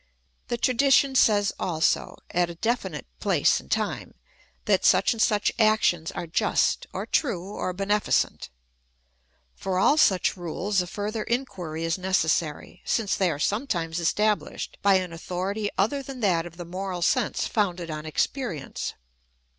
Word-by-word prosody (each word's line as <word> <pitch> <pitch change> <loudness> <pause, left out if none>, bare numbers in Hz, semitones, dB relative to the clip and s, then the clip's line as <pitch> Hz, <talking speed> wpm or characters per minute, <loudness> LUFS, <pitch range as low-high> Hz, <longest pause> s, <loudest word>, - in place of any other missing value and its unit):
The 240 - -2
tradition 270 +2 +3
says 205 -5 +4
also, 160 -3 0
at 175 0 +1
a 170 - -7
definite 190 - -2
place - - +2
and - - -15
time, - - -2 0.5
that - - +2
such - - +4
and 225 - -4
such 210 -3 +2
actions 215 -7 +3
are - - -4
just, 165 - +1
or - - -4
true, 195 - -1
or 185 - -2
benefi 200 +3 -1
cent. - - +1 1.1
Por 190 -1 -2
all 280 +10 +4
such 190 -11 +3
rules 185 +3 -1
a 180 - -5
further 210 +3 -3
inquiry 180 -11 -3
is 165 +2 -1
necessary, 165 -4 -1
since 210 -3 0
they 190 -2 +2
are 150 - -2
sometimes 175 - -1
estabhshed 210 +5 0
by 200 -1 +5
an 185 -2 -1
authority 190 +5 -3
other 250 +9 +1
than 270 -1 -8
that 175 -5 +2
of 170 0 -14
the 175 - -7
moral 180 0 -4
sense 250 +7 +1
founded 180 -6 -1
on 155 0 -5
experience. 170 - -3
190 Hz, 150 wpm, -26 LUFS, 170-215 Hz, 1.1 s, by